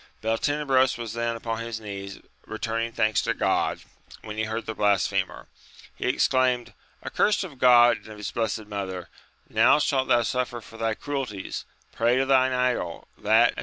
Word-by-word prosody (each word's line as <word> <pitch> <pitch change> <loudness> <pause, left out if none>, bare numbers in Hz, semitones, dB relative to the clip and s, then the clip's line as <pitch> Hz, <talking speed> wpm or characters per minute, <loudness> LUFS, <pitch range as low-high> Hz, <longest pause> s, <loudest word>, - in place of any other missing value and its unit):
Beltenebros 130 +3 +1
was 115 -2 -5
then 115 0 -1
upon 115 0 -4
his 115 -1 -4
knees 100 -2 -7 0.3
return 115 +1 -2
ing 115 - -7
thanks 110 -1 +1
to - - -1
God, - - 0 0.4
when 105 -1 -7
he 110 0 -1
heard 110 +1 -4
the 110 - -4
blasphemer, 100 -3 0 0.5
he - - -3
exclaimed, 130 -2 +1 0.3
Accursed 210 -1 +2
of 150 -9 -9
God 120 -1 +6
and - - -16
of 110 -1 -10
His 105 -2 -5
blessed 110 -1 -2
mother! 95 -4 -5 0.4
now - - +5
shalt 135 -3 +1
thou 120 0 +4
suffer 125 0 -2
for 115 0 -13
thy 115 -1 -1
cruelties; 130 -10 -4 0.3
pray 120 +2 +2
to 135 - +2
thine 130 -1 +4
idol, 125 -9 -1
that, 110 +3 +4
as. - - -9
115 Hz, 170 wpm, -25 LUFS, 110-125 Hz, 0.5 s, God